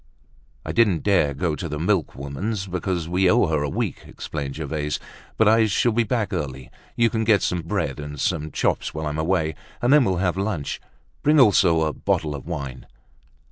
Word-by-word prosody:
"I -, -, -3 dB
didn't 105 Hz, -8 st, +2 dB
dare 90 Hz, -9 st, +2 dB
go 80 Hz, +1 st, -1 dB
to 85 Hz, -, -5 dB
the 75 Hz, -, -3 dB
milkwoman's, 90 Hz, +3 st, -2 dB
because 90 Hz, -2 st, -2 dB
we 90 Hz, +2 st, +2 dB
owe 120 Hz, +2 st, +4 dB
her 80 Hz, -4 st, 0 dB
a 75 Hz, -, -1 dB
week," -, -, -3 dB
explained 70 Hz, -3 st, -5 dB
Gervaise. 75 Hz, -1 st, -2 dB, 0.4 s
"But 110 Hz, -, +4 dB
I 110 Hz, +1 st, +5 dB
shall 115 Hz, +4 st, +2 dB
be 115 Hz, +2 st, +2 dB
back 110 Hz, -2 st, -1 dB
early; 65 Hz, -6 st, -4 dB, 0.2 s
you 115 Hz, -1 st, +3 dB
can 110 Hz, -1 st, 0 dB
get 110 Hz, -3 st, +3 dB
some 90 Hz, -1 st, 0 dB
bread 80 Hz, -, -2 dB
and 75 Hz, -1 st, -7 dB
some 80 Hz, -1 st, -1 dB
chops -, -, -1 dB
whilst 80 Hz, -1 st, -2 dB
I'm 75 Hz, +1 st, -4 dB
away, 80 Hz, -1 st, +1 dB, 0.3 s
and 125 Hz, +3 st, +3 dB
then 150 Hz, -2 st, +7 dB
we'll 95 Hz, -5 st, +1 dB
have 90 Hz, 0 st, 0 dB
lunch. 95 Hz, -8 st, -2 dB, 0.4 s
Bring 150 Hz, +1 st, +4 dB
also 90 Hz, -9 st, +5 dB
a 75 Hz, -1 st, 0 dB
bottle 75 Hz, -2 st, -1 dB
of 70 Hz, +2 st, -8 dB
wine." 70 Hz, -7 st, -6 dB
85 Hz, 190 wpm, -23 LUFS, 75-105 Hz, 0.4 s, then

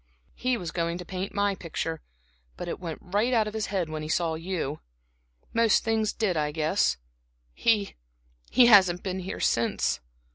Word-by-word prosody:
He 255 Hz, -1 st, 0 dB
was 175 Hz, -5 st, -5 dB
going 170 Hz, 0 st, -1 dB
to 180 Hz, -, -8 dB
paint 190 Hz, +2 st, -4 dB
my 200 Hz, 0 st, +1 dB
picture, 165 Hz, -3 st, -4 dB, 0.6 s
but 175 Hz, -, -5 dB
it -, -, -4 dB
went 165 Hz, -4 st, -5 dB
out 220 Hz, +1 st, +3 dB
of 210 Hz, -, -5 dB
his 220 Hz, -1 st, -2 dB
head 190 Hz, -4 st, -1 dB
when 155 Hz, 0 st, -5 dB
he 155 Hz, -, -6 dB
saw 165 Hz, 0 st, +1 dB
you. 160 Hz, -3 st, -3 dB, 0.7 s
Most 230 Hz, -2 st, +4 dB
things 220 Hz, -2 st, +1 dB
did, 205 Hz, -5 st, 0 dB
I 150 Hz, -1 st, 0 dB
guess. 155 Hz, -, +1 dB, 0.6 s
He 210 Hz, -, +1 dB, 0.6 s
he 250 Hz, -, +6 dB
hasn't 190 Hz, -6 st, +6 dB
been 190 Hz, -1 st, -3 dB
here 185 Hz, +1 st, -5 dB
since." 115 Hz, -, +1 dB
185 Hz, 170 wpm, -27 LUFS, 165-210 Hz, 0.7 s, he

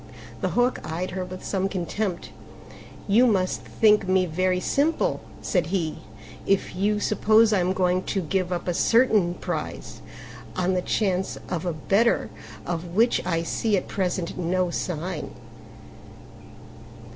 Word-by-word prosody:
The -, -, -1 dB
Hawk 245 Hz, +1 st, +2 dB
eyed 175 Hz, +4 st, -4 dB
her 185 Hz, 0 st, -3 dB
with 185 Hz, 0 st, -8 dB
some 195 Hz, -1 st, -1 dB
contempt. 185 Hz, 0 st, -3 dB, 0.8 s
"You 230 Hz, +5 st, +5 dB
must 190 Hz, -5 st, +1 dB
think 210 Hz, -3 st, +3 dB
me 185 Hz, 0 st, +3 dB
very 180 Hz, +2 st, 0 dB
simple," 320 Hz, -, +1 dB, 0.2 s
said 175 Hz, -5 st, 0 dB
he, 170 Hz, -3 st, -2 dB, 0.5 s
"if 195 Hz, -2 st, +1 dB
you 205 Hz, +3 st, +1 dB
suppose 215 Hz, +1 st, +4 dB
I 200 Hz, -, +3 dB
am 180 Hz, +1 st, +1 dB
going 185 Hz, -1 st, +1 dB
to 195 Hz, -, -1 dB
give 185 Hz, +1 st, -1 dB
up 175 Hz, 0 st, -3 dB
a 175 Hz, -, +1 dB
certain 215 Hz, -4 st, +3 dB
prize -, -, -5 dB, 0.5 s
on 185 Hz, +1 st, +1 dB
the 180 Hz, -, +1 dB
chance 190 Hz, -1 st, -1 dB
of 175 Hz, 0 st, -3 dB
a 175 Hz, -, 0 dB
better 195 Hz, -, +1 dB, 0.3 s
of 175 Hz, 0 st, -4 dB
which 235 Hz, +3 st, +3 dB
I 165 Hz, -2 st, 0 dB
see 210 Hz, +4 st, 0 dB
at -, -, -3 dB
present 180 Hz, -2 st, -2 dB
no 180 Hz, +1 st, 0 dB
signs." 170 Hz, -1 st, -4 dB
185 Hz, 145 wpm, -25 LUFS, 175-205 Hz, 0.8 s, You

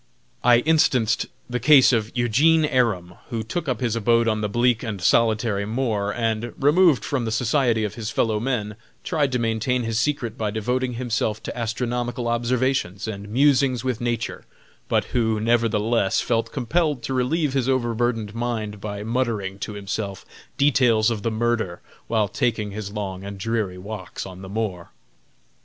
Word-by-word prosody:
I 120 Hz, 0 st, +6 dB
instanced 125 Hz, -7 st, +2 dB, 0.2 s
the 125 Hz, 0 st, -2 dB
case 135 Hz, 0 st, +6 dB
of 110 Hz, -2 st, 0 dB
Eugene 150 Hz, +7 st, +4 dB
Aram, 105 Hz, -11 st, 0 dB
who 115 Hz, -2 st, -3 dB
took 155 Hz, +9 st, -4 dB
up 125 Hz, -2 st, -2 dB
his 120 Hz, -3 st, 0 dB
abode 115 Hz, +1 st, +2 dB
on 110 Hz, -1 st, +1 dB
the 105 Hz, -, -1 dB
bleak 120 Hz, +2 st, +2 dB
and 110 Hz, -5 st, -4 dB
solitary 110 Hz, +2 st, +2 dB
moor, 110 Hz, -2 st, -1 dB
and, 115 Hz, 0 st, -1 dB
removed 150 Hz, -, +4 dB
from 130 Hz, -4 st, -1 dB
the 110 Hz, -, -2 dB
society 120 Hz, 0 st, +1 dB
of 105 Hz, -2 st, -2 dB
his 110 Hz, -1 st, -5 dB
fellow 110 Hz, -2 st, 0 dB
men, 110 Hz, -4 st, -2 dB, 0.3 s
tried 150 Hz, -6 st, 0 dB
to 125 Hz, -, +1 dB
maintain 115 Hz, +2 st, 0 dB
his 115 Hz, -1 st, -1 dB
secret 125 Hz, -4 st, -1 dB
by 110 Hz, -1 st, 0 dB
devoting 125 Hz, +4 st, -1 dB
himself 115 Hz, -3 st, -2 dB
to -, -, -5 dB
astronomical 120 Hz, +1 st, -2 dB
observations 120 Hz, -4 st, 0 dB
and 100 Hz, -1 st, -6 dB
musings 130 Hz, 0 st, +3 dB
with 130 Hz, -3 st, -2 dB
nature, 120 Hz, -1 st, -2 dB, 0.5 s
but -, -, +2 dB
who, 110 Hz, -3 st, +1 dB
nevertheless, 115 Hz, -2 st, +1 dB
felt 115 Hz, -1 st, 0 dB
compelled 145 Hz, 0 st, 0 dB
to 135 Hz, -, -3 dB
relieve 135 Hz, +3 st, 0 dB
his 135 Hz, -2 st, 0 dB
overburdened 120 Hz, -4 st, 0 dB
mind 110 Hz, -3 st, -3 dB
by 105 Hz, -1 st, -5 dB
muttering 110 Hz, -5 st, -2 dB
to 105 Hz, -, -5 dB
himself 100 Hz, -1 st, -5 dB, 0.3 s
details 120 Hz, -5 st, +3 dB
of 110 Hz, -3 st, -3 dB
the 115 Hz, -, 0 dB
murder 110 Hz, -5 st, -1 dB, 0.3 s
while 110 Hz, -2 st, +1 dB
taking 105 Hz, 0 st, -1 dB
his 100 Hz, -1 st, -6 dB
long 95 Hz, -3 st, -5 dB
and 100 Hz, 0 st, -7 dB
dreary 105 Hz, -2 st, -2 dB
walks 100 Hz, 0 st, -7 dB
on 95 Hz, -1 st, -9 dB
the 95 Hz, -, -9 dB
moor. 100 Hz, -5 st, -3 dB
115 Hz, 165 wpm, -23 LUFS, 105-125 Hz, 0.5 s, I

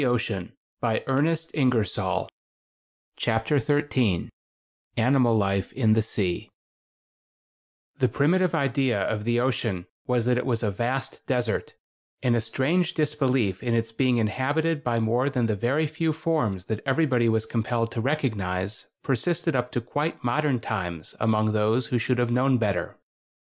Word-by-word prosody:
[Illustration: 115 Hz, -7 st, -1 dB, 0.3 s
A 115 Hz, -2 st, 0 dB
MARINE 135 Hz, +2 st, +2 dB, 0.3 s
NATURALIST.] 125 Hz, -, +1 dB, 0.9 s
CHAPTER 115 Hz, +5 st, +1 dB
XIII 135 Hz, -, +1 dB, 0.7 s
ANIMAL 120 Hz, -1 st, +4 dB
LIFE 100 Hz, -1 st, 0 dB
IN 110 Hz, -5 st, +3 dB
THE 110 Hz, -, +3 dB
SEA 100 Hz, -4 st, -2 dB, 1.5 s
The 130 Hz, -, +3 dB
primitive 170 Hz, +4 st, +2 dB
idea 135 Hz, -7 st, +1 dB
of 105 Hz, -1 st, -2 dB
the 120 Hz, 0 st, +2 dB
ocean 115 Hz, -8 st, -1 dB, 0.2 s
was 125 Hz, -2 st, +1 dB
that 125 Hz, 0 st, +2 dB
it -, -, -3 dB
was 120 Hz, -2 st, 0 dB
a 105 Hz, -, +1 dB
vast 130 Hz, +6 st, -3 dB
desert, 125 Hz, -4 st, -1 dB, 0.5 s
and 120 Hz, -2 st, +3 dB
a 115 Hz, -, +1 dB
strange 160 Hz, +10 st, 0 dB
disbelief 135 Hz, -, +1 dB
in 120 Hz, -2 st, 0 dB
its 115 Hz, -1 st, 0 dB
being 125 Hz, +1 st, +2 dB
inhabited 145 Hz, +8 st, 0 dB
by 120 Hz, -1 st, +1 dB
more 120 Hz, +5 st, +1 dB
than 125 Hz, -4 st, 0 dB
the 110 Hz, -2 st, 0 dB
very 135 Hz, +10 st, +1 dB
few 155 Hz, +1 st, -1 dB
forms 150 Hz, -, -1 dB
that 110 Hz, -1 st, -3 dB
everybody 130 Hz, -4 st, +2 dB
was 110 Hz, 0 st, +1 dB
compelled 115 Hz, 0 st, -1 dB
to 115 Hz, -, -3 dB
recognize 105 Hz, -8 st, -2 dB, 0.2 s
persisted 165 Hz, +4 st, 0 dB
up 125 Hz, 0 st, -1 dB
to 120 Hz, -, 0 dB
quite 145 Hz, +7 st, -3 dB
modern 125 Hz, +2 st, +1 dB
times 90 Hz, -8 st, -4 dB
among 110 Hz, -1 st, +2 dB
those 110 Hz, +4 st, +2 dB
who 125 Hz, -4 st, +1 dB
should 125 Hz, +3 st, 0 dB
have 120 Hz, -1 st, +1 dB
known 130 Hz, +2 st, +3 dB
better. 100 Hz, -6 st, -1 dB
120 Hz, 150 wpm, -26 LUFS, 110-135 Hz, 1.5 s, ANIMAL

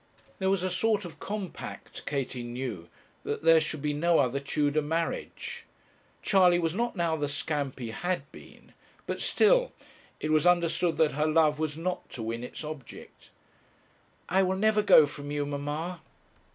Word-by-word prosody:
There 190 Hz, -1 st, +1 dB
was 195 Hz, -2 st, +1 dB
a 185 Hz, -, -1 dB
sort 205 Hz, +2 st, +1 dB
of 175 Hz, -, -10 dB
compact, 200 Hz, -3 st, -7 dB
Katie 135 Hz, -3 st, -2 dB
knew, 120 Hz, -7 st, -5 dB, 0.3 s
that -, -, -3 dB
there 165 Hz, 0 st, +6 dB
should 155 Hz, -2 st, -3 dB
be 150 Hz, -1 st, 0 dB
no 165 Hz, +3 st, +3 dB
other 135 Hz, 0 st, +2 dB
Tudor 145 Hz, +2 st, 0 dB
marriage. 165 Hz, +3 st, -3 dB, 0.6 s
Charley 180 Hz, -3 st, +5 dB
was 165 Hz, -2 st, 0 dB
not 235 Hz, +4 st, -1 dB
now 170 Hz, -3 st, +1 dB
the 145 Hz, -2 st, -1 dB
scamp 145 Hz, -1 st, -2 dB
he 120 Hz, -4 st, -5 dB
had 175 Hz, +5 st, -2 dB
been, -, -, -15 dB, 0.3 s
but -, -, -4 dB
still -, -, +3 dB, 0.5 s
it 155 Hz, -, -2 dB
was 155 Hz, +2 st, +4 dB
understood 170 Hz, -1 st, +2 dB
that 155 Hz, -2 st, +3 dB
her 150 Hz, +3 st, 0 dB
love 155 Hz, -1 st, +3 dB
was 155 Hz, -1 st, -2 dB
not 180 Hz, +2 st, -3 dB
to 115 Hz, -, -5 dB
win 115 Hz, +2 st, -3 dB
its 125 Hz, -, -7 dB
object. 150 Hz, -5 st, -10 dB, 1.0 s
'I 190 Hz, +1 st, +3 dB
will 190 Hz, 0 st, +1 dB
never 215 Hz, +1 st, +3 dB
go 180 Hz, -7 st, +7 dB
from 145 Hz, 0 st, -8 dB
you, 145 Hz, 0 st, -1 dB
mamma.' 145 Hz, +5 st, -4 dB
155 Hz, 165 wpm, -28 LUFS, 145-180 Hz, 1.0 s, go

